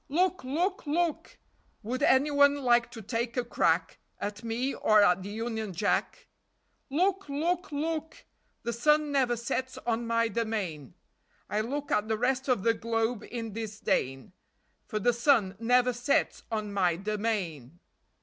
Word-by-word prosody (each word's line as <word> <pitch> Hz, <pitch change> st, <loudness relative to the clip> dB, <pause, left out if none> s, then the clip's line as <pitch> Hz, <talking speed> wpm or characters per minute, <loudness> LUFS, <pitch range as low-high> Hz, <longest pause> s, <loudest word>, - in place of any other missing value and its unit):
Look! 365 Hz, +4 st, +1 dB
Look! 335 Hz, +7 st, -1 dB
Look! 330 Hz, +1 st, -1 dB, 0.5 s
Would 245 Hz, +4 st, -3 dB
any 275 Hz, +3 st, +4 dB
one 285 Hz, 0 st, +5 dB
like 240 Hz, -1 st, +4 dB
to 225 Hz, -2 st, -10 dB
take 235 Hz, +3 st, -3 dB
a 245 Hz, -, 0 dB
crack 165 Hz, -7 st, +1 dB, 0.2 s
At 205 Hz, +1 st, -5 dB
me 235 Hz, +4 st, -1 dB
or 215 Hz, -1 st, +4 dB
at 180 Hz, -1 st, +4 dB
the 195 Hz, -, -6 dB
Union 220 Hz, -1 st, -4 dB
Jack? 170 Hz, -, -1 dB, 0.6 s
Look! 370 Hz, +4 st, 0 dB
Look! 330 Hz, +4 st, -1 dB
Look! 315 Hz, +2 st, -3 dB, 0.4 s
The 235 Hz, 0 st, -2 dB
sun 300 Hz, +5 st, +2 dB
never 255 Hz, -4 st, +2 dB
sets 260 Hz, +3 st, -3 dB
on 235 Hz, 0 st, -1 dB
my 230 Hz, 0 st, +2 dB
domain. 200 Hz, -, -3 dB, 0.6 s
I 210 Hz, -, +1 dB
look 280 Hz, +5 st, -4 dB
at 210 Hz, +1 st, +1 dB
the 220 Hz, 0 st, 0 dB
rest 255 Hz, +3 st, 0 dB
of 250 Hz, -7 st, +1 dB
the 230 Hz, -, +4 dB
globe 225 Hz, 0 st, -1 dB
in 225 Hz, -3 st, -5 dB
disdain,, 200 Hz, -, -2 dB, 0.5 s
For 215 Hz, -, -3 dB
the 240 Hz, +4 st, +2 dB
sun 235 Hz, -6 st, +3 dB
never 245 Hz, +2 st, +3 dB
sets 245 Hz, +4 st, 0 dB
on 215 Hz, -2 st, -2 dB
my 180 Hz, -4 st, +2 dB
domain! 190 Hz, -, -3 dB
235 Hz, 150 wpm, -29 LUFS, 215-275 Hz, 0.6 s, one